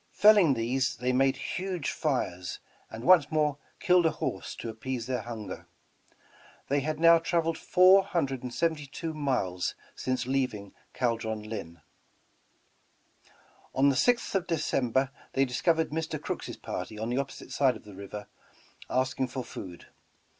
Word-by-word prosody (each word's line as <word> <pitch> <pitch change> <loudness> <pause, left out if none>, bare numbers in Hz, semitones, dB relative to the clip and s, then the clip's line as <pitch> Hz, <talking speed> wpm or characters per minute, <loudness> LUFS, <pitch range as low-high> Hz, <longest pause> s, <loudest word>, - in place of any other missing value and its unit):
Felling 205 -9 +6
these, 125 +4 0
they 125 +1 -1
made 135 +1 +3
huge 180 -3 -3
fires 90 - -2 0.3
and 110 +1 -8
once 165 -4 +6
more 150 -2 +1 0.2
killed 180 -3 +4
a - - +4
horse - - -4
to - - -7
appease 115 +2 -4
their 125 0 -2
hunger. 115 -3 -7 1.0
They 140 +1 +2
had 155 +2 -2
now 165 0 +7
traveled 165 0 0
four 185 +4 +6
hundred 135 -9 -1
and 125 - -5
seventy 160 +1 -1
two 160 +3 -5
miles 125 -12 -1 0.2
since 130 -1 -2
leaving 125 -7 -2 0.2
"Caldron 115 -3 -1
Linn." 85 -7 -7 1.9
On 140 +2 +5
the 140 - +1
6th 245 - +2
of 190 -2 0
December, 130 -5 0 0.2
they 135 0 +3
discovered 160 +6 +1
Mr. 160 +1 -2
Crooks' - - -5
party 110 - -5
on 110 +2 -3
the 125 +2 0
opposite 140 -1 -6
side 135 -3 +3
of 110 - -11
the 105 - -12
river 100 +2 -8 0.6
avsking 130 0 0
for 130 0 -4
food. 90 -6 -9
135 Hz, 145 wpm, -29 LUFS, 115-160 Hz, 1.9 s, now